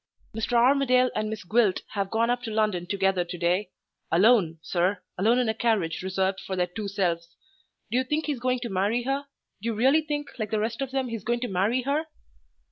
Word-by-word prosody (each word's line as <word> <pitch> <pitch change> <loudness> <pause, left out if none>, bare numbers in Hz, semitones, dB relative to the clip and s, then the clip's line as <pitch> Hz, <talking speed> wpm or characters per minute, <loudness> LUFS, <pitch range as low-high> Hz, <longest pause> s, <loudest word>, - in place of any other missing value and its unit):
Mr. 225 +3 -3
Armadale 255 +1 +4
and 215 - -1
Miss 220 -1 -5
Gwilt 210 0 +2
have 200 -2 -2
gone 230 +2 +1
up 245 0 -1
to 240 - -5
London 210 -5 0
together 195 -2 +1
to 175 +1 -7
day 180 +4 0 0.4
alone, 185 -2 +4
sir 180 +3 0
alone 220 +6 +3
in 250 -2 +2
a 220 - +1
carriage 220 -8 0
reserved 190 +1 -1
for 190 - -5
their 180 -1 +1
two 200 +4 -6
selves. 170 -4 -2 0.6
Do 245 - +2
you - - +1
think 300 +4 -1
he's 290 -5 -2
going 250 0 0
to 240 - -4
marry 205 +5 0
her? 275 +2 -2 0.3
Do 225 - -4
you 230 - -1
really 265 +8 +4
think, 295 -1 -4
like 215 -1 -2
the 220 - 0
rest 225 +4 -2
of 270 - -2
them, 265 -1 -2
he's 230 -4 -5
going 240 +1 -1
to 250 - -1
marry 210 +7 +1
her?" 295 +4 0
220 Hz, 215 wpm, -26 LUFS, 190-250 Hz, 0.6 s, Armadale